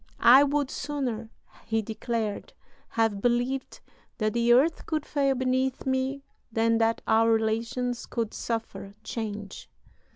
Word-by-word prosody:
"I 260 +4 +8
would 285 -1 0
sooner," 250 -7 -3 0.3
he 225 -1 -1
declared, 220 -1 -3 0.4
"have 225 -3 0
believed 245 +3 -1 0.4
that 215 -2 0
the 235 0 +2
earth 280 +7 +3
could 310 -2 -1
fail 275 -2 +1
beneath 260 0 0
me 265 +1 -1 0.3
than 225 0 +2
that 225 0 +1
our 225 +1 +4
relations 230 +2 -1
could 230 -3 -3
suffer 225 -3 -4
change. 210 -3 -6
235 Hz, 125 wpm, -27 LUFS, 225-260 Hz, 0.4 s, I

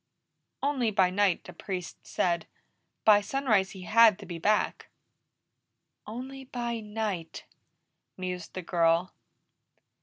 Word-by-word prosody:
"Only 270 -5 +1
by 190 -3 +3
night, 195 -2 +2
the 180 - -11
Priest 180 0 -6
said. 170 -2 0 0.6
By 210 -1 +7
sunrise 215 -4 +1
he 190 -2 -9
had 220 0 +6
to 205 - -10
be 170 -2 -6
back." 210 +5 +1 1.2
"Only 260 +4 -7
by 240 -2 -3
night!" 210 -6 -4 0.7
mused 180 -2 -5
the 185 - -4
girl. 170 +1 +2
200 Hz, 115 wpm, -29 LUFS, 180-230 Hz, 1.2 s, By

